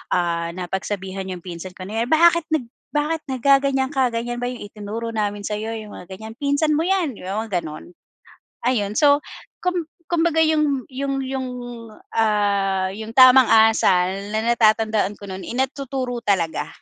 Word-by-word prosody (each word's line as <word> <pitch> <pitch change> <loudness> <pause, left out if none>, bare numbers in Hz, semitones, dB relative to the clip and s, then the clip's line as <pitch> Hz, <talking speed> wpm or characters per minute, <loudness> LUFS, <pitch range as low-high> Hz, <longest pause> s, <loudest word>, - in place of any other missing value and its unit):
ah, 170 -1 0
napagsabihan 190 +1 -4
'yung 180 -2 -6
pinsan 180 +1 -7
ko 185 - -7
na 220 +2 -2
'yan, 240 - -5
"Bakit 335 0 +5
nag 310 -6 +1 0.3
bakit 305 +2 0
naggaganiyan 270 +1 +2
ka? 265 -3 +2
Ganiyan 240 +1 -3
ba 245 - -1
'yong 245 -4 -7
itinuro 215 +3 -6
namin 205 -2 -2
sa'yo?" 215 +2 -3
'Yong 215 -1 -9
mga 180 - -10
ganiyan. 220 +2 -9
"Pinsan 285 +2 +2
mo 310 - +1
'yan." 370 -8 +1
'Di - - -12
ba, 205 +3 -2
mga 190 -5 -1
gano'n. 155 +2 -9 0.8
Ayun, 210 -6 +1
so 285 +1 +5 0.4
kum 360 -2 0 0.3
kumbaga 330 -1 +2
'yong 305 -4 +1
'yong 270 +1 -2
'yong 260 -1 -3 0.7
ah, 200 -3 +1
'yong 220 +2 -7
tamang 255 -1 +8
asal 220 -5 +5 0.3
na 220 - 0
natatandaan 215 -2 +2
ko 205 - -10
no'n 190 0 -6
eh, - - -5
natuturo 265 -2 -2
talaga. 165 -7 0
225 Hz, 165 wpm, -22 LUFS, 200-275 Hz, 0.8 s, tamang